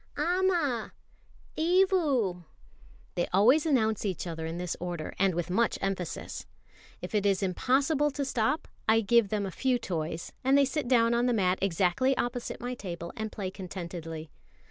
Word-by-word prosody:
"Amma! 335 -7 +1 0.6
Evu!" 315 - +2 0.7
They 175 - -1
always 250 - +5
announce 220 -7 +2
each 190 -5 -2
other 160 -2 -4
in 165 +1 -4
this 180 -1 -3
order, 175 -3 -4
and 190 -2 +3
with 175 +1 -2
much 230 +5 +2
emphasis. 195 -3 -4 0.6
If - - -6
it 210 -2 +2
is 200 -1 +2
impossible 275 - +2
to 280 0 -3
stop, 260 +4 0 0.2
I 225 0 +5
give 225 0 +3
them 205 -1 -1
a 190 - -4
few 255 +5 +1
toys, 165 -6 -4
and 265 +2 +4
they 280 - +5
sit 275 0 -2
down 235 -2 +4
on 240 +1 +2
the 245 - +2
mat 185 -4 +2
exactly 195 +8 +2
opposite 245 0 -3
my 245 +1 -4
table 170 -7 -6
and 220 -2 -4
play 190 -3 -4
contentedly. 170 -4 -7
220 Hz, 165 wpm, -29 LUFS, 180-265 Hz, 0.7 s, always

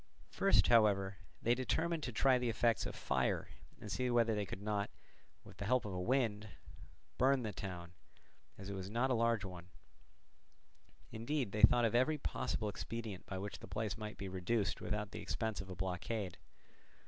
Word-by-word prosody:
First, - - +4
however, 100 -4 +4 0.3
they 120 - +4
determined 160 +6 0
to 130 - -3
try 130 +3 +4
the 125 -1 0
effects 115 +1 +2
of - - -6
fire - - 0 0.3
and - - -7
see 125 -1 0
whether 115 -2 +3
they 105 -2 -1
could 95 - -6
not, 105 -1 -1 0.5
with - - -14
the 100 - -4
help 125 +2 +2
of 100 - -4
a 90 - -2
wind, 110 -2 +1 0.7
burn 130 0 +4
the 110 -2 -3
town, 90 -3 -6 0.6
as 95 - -8
it 100 - -4
was 95 -1 -5
not 120 +5 +1
a - - +4
large 115 -3 +2
one; 90 -1 -8 1.4
indeed 120 0 -2
they 105 - -2
thought 120 +2 +7
of 115 - +1
every 130 +6 +3
possible 110 -5 -2
expedient 110 -1 -5
by 95 - -4
which 100 +2 -5
the - - -10
place 110 -1 -2
might 105 0 -6
be 100 - -5
reduced 95 +3 -1
without 105 -1 -2
the - - -6
expense 110 +2 -2
of 95 - -10
a 95 - -5
blockade. 95 +2 -3
110 Hz, 185 wpm, -36 LUFS, 100-120 Hz, 1.4 s, thought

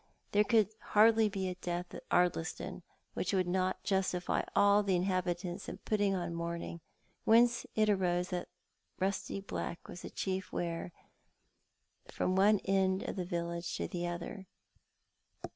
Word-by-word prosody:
There 205 +1 +5
could 215 -2 +3 0.3
hardly 220 0 +6
be 195 -2 -2
a 185 - -2
death 175 0 -4
at - - -10
Ardliston 175 -2 0 0.3
which - - -2
would 185 -1 +2
not 185 +1 0
justify 190 -3 0
all 205 +1 +6
the 195 -2 +1
inhabitants 180 -1 -1
in - - -6
putting 205 -2 +1
on 175 -2 -3
mourning, 170 0 -4 0.4
whence 235 +2 +4
it 215 -1 +3
arose 180 -3 +1
that 180 -2 -3 0.5
rusty 195 +1 -1
black 175 -3 -5
was 175 - -8
the - - -7
chief 190 -1 -3
wear 170 0 -3 1.2
from 185 - -1
one 205 +2 +5
end 190 -1 +2
of - - -4
the 185 -2 -2
village 170 -1 -3
to - - -2
the 175 -1 -3
other. 175 +2 -6
185 Hz, 145 wpm, -33 LUFS, 175-200 Hz, 1.2 s, hardly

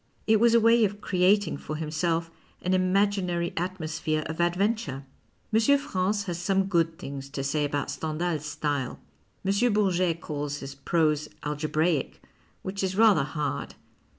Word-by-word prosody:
It 220 -1 +4
was 235 +1 +5
a - - +7
way 230 +1 +5
of 205 0 0
creating 185 -2 +2
for 155 - -6
himself 165 +2 -1 0.3
an 185 - +1
imaginary 185 -2 +1
atmosphere 160 -3 -2
of 160 +2 -3
adventure. 175 - 0 0.5
M. 230 +6 +5
France 205 -6 -1
has 175 -3 -4
some 195 +2 +1
good 165 -3 +1
things 140 -5 -7
to 140 -1 -4
say 145 +2 0
about 145 0 -2
Stendhal's 155 -1 -2
style. 145 -4 -2 0.5
M. 205 +4 +2
Bourget 185 -5 +1
calls 145 -2 -4
his 135 -1 -7
prose 150 +1 +1 0.2
alge 150 0 -3
braic, 155 -2 +1 0.5
which 195 +1 -4
is 190 0 -1
rather 215 -7 +6
hard. 145 -1 -3
170 Hz, 150 wpm, -27 LUFS, 150-195 Hz, 0.5 s, a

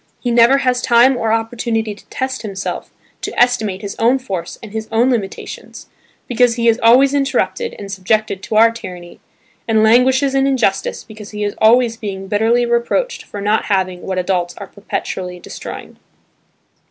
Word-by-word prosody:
He 245 - -2
never 235 +3 +5
has 250 -1 +1
time 245 +2 +4
or 225 -2 -1
opportunity 225 -1 -1
to 205 - -18
test 260 0 -4
himself, 200 -3 -5 0.3
to - - -4
estimate 220 -6 +1
his 200 - -5
own 240 +4 +3
force 190 -10 -5
and 215 - -9
his 220 0 -5
own 235 +4 +3
limitations 210 -6 -5 0.4
because 245 -1 +2
he 235 -1 0
is 230 +1 +3
always 255 +4 +5
interrupted 285 - -1
and 200 -1 -8
subjected 195 +1 -1
to 215 - -5
our 225 +1 +6
tyranny, 180 -6 -10 0.5
and 220 -1 +3
languishes 260 +4 +4
in 270 0 +2
injustice 235 -8 0
because 215 -1 -11
he 210 0 -5
is 205 -1 -1
always 230 +1 +4
being 195 -3 -6
bitterly 225 +4 +2
reproached 235 - 0
for 205 - -8
not 210 +2 +1
having 185 -3 -1
what 190 -1 -4
adults 180 -1 -1
are - - -7
perpetually 180 -3 -5
destroying. - - -9
225 Hz, 165 wpm, -17 LUFS, 200-245 Hz, 0.5 s, our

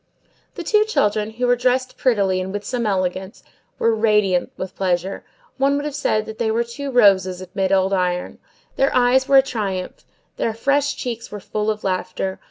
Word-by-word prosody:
The 350 - -5
two 425 +5 +3
children, 210 - 0
who 240 +3 -3
were 245 0 +4
dressed 255 +1 0
prettily 200 -7 +1
and 185 +1 -5
with 205 +1 -5
some 240 -3 -2
elegance, 190 +1 -2 0.3
were 230 - +2
radiant 210 -5 +2
with 185 0 -6
pleasure; 185 0 -1 0.4
one 275 +1 +3
would 285 +1 -2
have 300 - -3
said 215 -6 0
that 220 - -9
they 230 -2 +1
were 230 +2 +1
two 275 +4 -6
roses 195 -7 +4
amid 190 +1 -2
old 190 0 +2
iron; 180 -1 -1 0.4
their 270 - +3
eyes 255 +1 +3
were 275 - +6
a 265 - +7
triumph; 200 -8 -4 0.3
their 225 - -1
fresh 285 +4 +1
cheeks 235 -3 -5
were 210 - -6
full 210 +2 -3
of 215 -1 -2
laughter. 185 0 -2
215 Hz, 185 wpm, -21 LUFS, 190-250 Hz, 0.4 s, a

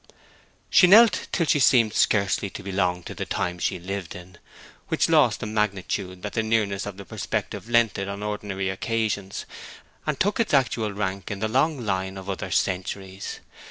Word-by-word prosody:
She 180 - +7
knelt 220 +4 +6
till 170 - +1
she 145 - +3
seemed 120 -4 +4
scarcely 100 -1 +2
to - - -9
belong 90 -2 -1
to - - -7
the - - -4
time 90 0 -2
she - - -1
lived 95 0 -5
in, 90 0 -12 0.5
which - - +1
lost - - +4
the - - -3
magnitude 100 -3 -2
that 105 - -4
the 115 - +1
nearness 110 -3 0
of 100 -1 -7
its 100 - -10
perspective 115 - -4
lent 115 -4 +3
it 100 - -3
on 100 +1 -5
ordinary 105 -2 -3
occasions, 105 -1 -2 0.6
and 150 -3 -1
took 205 +4 +1
its 225 -10 +2
actual 115 -5 +1
rank 100 -2 -3
in 100 - -3
the 110 +2 -1
long 135 +2 +1
line 95 -1 -2
of 95 +1 -5
other 95 - -5
centuries. 95 +1 -2
100 Hz, 180 wpm, -25 LUFS, 95-115 Hz, 0.6 s, She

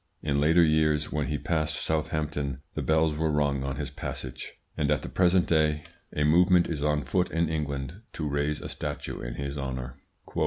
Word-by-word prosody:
In 70 -1 +1
later 80 +4 +5
years, 75 -2 +2
when 75 -3 -1
he 75 - -1
passed 80 0 -1
Southampton, 75 -3 -2
the - - -3
bells 80 0 +2
were 80 +1 0
rung 70 -2 +1
on 70 0 -2
his 70 -1 -4
passage; - - -6 0.2
and 70 - 0
at 75 -2 +1
the - - -5
present 90 -1 +3
day 75 -2 +2 0.3
a 75 - 0
movement 85 +3 +5
is 80 -4 -3
on 75 -1 +1
foot 90 +7 +1
in 85 0 +1
England 75 +3 -3
to 75 - -3
raise 75 +1 -1
a - - -6
statue - - -5
in - - -5
his 70 +1 -4
honour. 65 -2 -4
75 Hz, 190 wpm, -28 LUFS, 70-80 Hz, 0.3 s, later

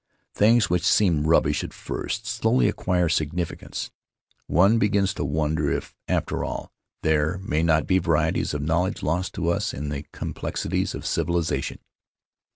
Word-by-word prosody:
Things 110 +1 +4
which 90 -2 +1
seemed 80 -7 +3
rubbish 80 - +3
at - - -7
first 110 +2 -4
slowly 115 +2 +2
acquire 90 -4 +1
significance; 80 +1 -2 0.6
one 100 +6 +4
begins 100 -2 +2
to - - -3
won 75 +2 0
der 75 -2 0
if, - - -3
after - - -1
all, - - -5 0.3
there 80 +2 +2
may 80 -5 -1
not 80 -1 +3
be 95 0 +3
varieties 85 -4 +1
of 75 - -2
knowledge 85 +5 0
lost 90 +5 -1
to 85 - -1
us 85 - -1
in 75 +2 -4
the 70 0 -4
complexities - - -3
of - - -7
civilization. 85 0 -1
85 Hz, 155 wpm, -24 LUFS, 80-95 Hz, 0.6 s, Things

